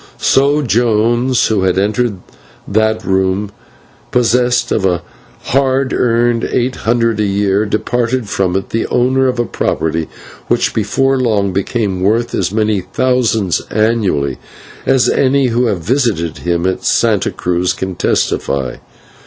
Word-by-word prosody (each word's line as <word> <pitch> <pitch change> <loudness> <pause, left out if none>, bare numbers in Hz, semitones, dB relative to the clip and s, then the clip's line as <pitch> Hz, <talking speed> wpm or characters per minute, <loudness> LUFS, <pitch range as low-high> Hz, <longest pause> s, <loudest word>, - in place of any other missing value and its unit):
So 145 +2 +2
Jones, 120 +1 +2
who 110 -3 +1
had 95 -1 +1
entered 105 +2 0 0.5
that 110 +1 0
room 95 +1 0 0.6
possessed 125 0 +1
of 105 - 0
a 90 -3 0 0.4
hard 135 0 +1
earned 120 -1 +1
eight 125 +1 -1
hundred 115 -1 0
a - - +2
year, 100 +1 +1
departed 120 +2 -1
from 95 -2 -1
it 95 - -2
the 115 - -1
owner 130 +2 +2
of 125 -1 -1
a 120 - 0
property 80 -5 -2 0.4
which, - - +1
before 135 0 +1
long, 105 -6 0
became 100 -1 -1
worth 110 +5 +1
as 90 -1 -1
many 105 -2 0
thousands 110 -1 0
annually, 105 - 0 0.5
as 130 -2 +3
any 135 -1 +2
who 120 +1 +1
have 95 -7 -2
visited 110 - 0
him 85 0 -1
at 95 0 -1
Santa - - +2
Cruz 90 +1 -1
can 95 0 -4
testify. 70 -6 -1
110 Hz, 135 wpm, -15 LUFS, 95-125 Hz, 0.6 s, as